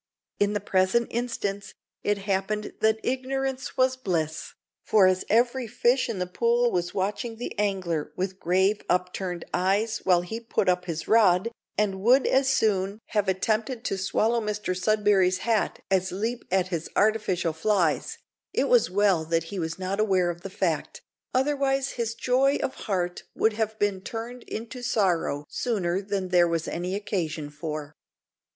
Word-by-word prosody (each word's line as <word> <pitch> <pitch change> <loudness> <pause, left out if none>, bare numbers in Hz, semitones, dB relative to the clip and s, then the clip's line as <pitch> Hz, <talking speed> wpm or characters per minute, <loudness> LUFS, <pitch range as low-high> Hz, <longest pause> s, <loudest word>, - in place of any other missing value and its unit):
In 205 0 +2
the 205 - 0
present 190 +4 +1
instance 215 -4 -3 0.3
it 205 0 +1
happened 200 +1 -2
that 220 0 +3
"ignorance 265 +1 -2
was 255 0 +3
bliss," 165 -10 -3 0.3
for 210 -3 +5
as 185 0 +3
every 240 +2 +2
fish 245 +3 +2
in 225 - -3
the 180 - -1
pool 235 +5 +2
was 175 -1 -2
watching 205 +4 -2
the 240 - -5
angler 185 -7 -1
with 185 +1 -3
grave 190 +4 +2
upturned 180 0 -1
eyes 205 +5 +1
while 180 -2 +4
he 200 +6 -5
put 230 -4 -1
up 180 0 +2
his 165 -2 -4
rod, 215 -1 +4 0.3
and 195 -2 0
would 250 +6 +5
as 265 0 +3
soon 205 -5 +1
have 210 -2 0
attempted 220 +5 0
to - - 0
swallow 225 +4 +1
Mr 210 -3 -2
Sudberry's 195 -2 +3
hat 225 -3 0
as 190 -1 +2
leap 225 +6 -3
at 185 -1 +1
his 170 -3 -3
artificial 205 -6 +1
flies, 170 -1 +1 0.4
it - - +1
was - - +4
well 195 -3 +3
that 165 0 0
he 195 - -3
was 160 -1 -3
not 190 +2 -3
aware 190 -5 +2
of 170 0 -10
the 195 - -6
fact, 190 - -2 0.3
otherwise 270 0 +1
his 230 -1 -3
joy 265 +4 +2
of 265 - -1
heart 180 -4 -2
would 220 - +2
have 220 0 -2
been 205 -3 0
turned 235 +4 -6
into 235 +3 -6
sorrow 180 -10 0
sooner 190 -6 -1
than 195 -2 -3
there 175 -1 +5
was 165 -1 -1
any 180 +2 -3
occasion 165 -7 -3
for. 150 -1 -5
200 Hz, 160 wpm, -26 LUFS, 180-230 Hz, 0.4 s, for